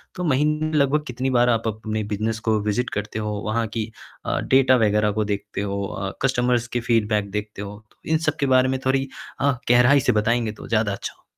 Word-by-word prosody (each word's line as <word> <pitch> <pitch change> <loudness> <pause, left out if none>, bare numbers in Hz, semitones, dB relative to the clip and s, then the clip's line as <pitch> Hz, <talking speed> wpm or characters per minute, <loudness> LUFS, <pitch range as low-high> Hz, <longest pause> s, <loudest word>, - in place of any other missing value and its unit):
तो 180 - -4
महीने 150 +1 +1
में 155 - -5
लगभग 140 +2 +2
कितनी 125 +2 -2
बार 125 -1 +4
आप 115 -1 +1
अपने 110 0 -3
बिज़नेस 110 +2 -1
को 110 -1 +3
विज़िट 105 +4 0
करते 105 +1 -3
हो, 105 0 -2
वहाँ 115 +2 0
की 110 0 -3 0.3
अ, - - 0
डेटा 130 -1 +4
वग़ैरह 105 0 +2
को 110 +1 0
देखते 100 0 -5
हो, 100 0 -2
अ, 95 0 -4
कस्टमर्स 125 -2 +1
की - - -1
फ़ीडबैक 105 -3 +1
देखते 105 0 -5
हो? 105 +1 -8 0.2
इन 160 - +2
सबके 140 - -1
बारे 130 0 +4
में 130 0 -1
थोड़ी 135 +1 +1 0.3
अ, 140 - +4 0.2
गहराई 125 +3 +6
से - - +2
बताएंँगे 115 0 0
तो - - -11
ज़्यादा 110 -3 +1
अच्छा - - -6
हो - - -31
115 Hz, 210 wpm, -23 LUFS, 105-130 Hz, 0.3 s, गहराई